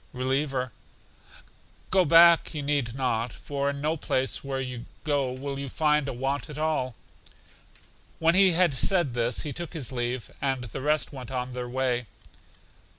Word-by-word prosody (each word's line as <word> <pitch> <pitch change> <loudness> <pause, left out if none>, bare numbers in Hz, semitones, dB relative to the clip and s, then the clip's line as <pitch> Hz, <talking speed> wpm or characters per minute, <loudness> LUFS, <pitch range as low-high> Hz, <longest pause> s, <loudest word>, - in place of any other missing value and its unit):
Reliever: 130 0 -1 1.2
Go 185 -1 +5
back 170 +1 +6
you 145 - -3
need 140 -5 -1
not, 125 -3 -1
for 140 +3 -3
in 140 0 -4
no 155 +2 +1
place 130 -4 -1
where 135 -1 -3
you 125 -2 -5 0.2
go 145 -4 0
will 135 +2 -5
you 140 -1 -5
find 150 0 +2
a - - -2
want 135 +5 -2
at 150 - -8
all. 150 -6 -1 1.2
When 165 +1 +3
he 190 -1 +5
had 175 -3 +3
said 160 0 +2
this 120 0 0
he 150 - -4
took 175 +2 -6
his 145 -7 -3
leave, 120 -1 -3
and 135 -2 0
the 120 +3 -6
rest 150 +2 +1
went 130 -4 -8
on 125 -1 -3
their 125 -1 -5
way. 125 -2 -1
135 Hz, 165 wpm, -27 LUFS, 125-150 Hz, 1.2 s, back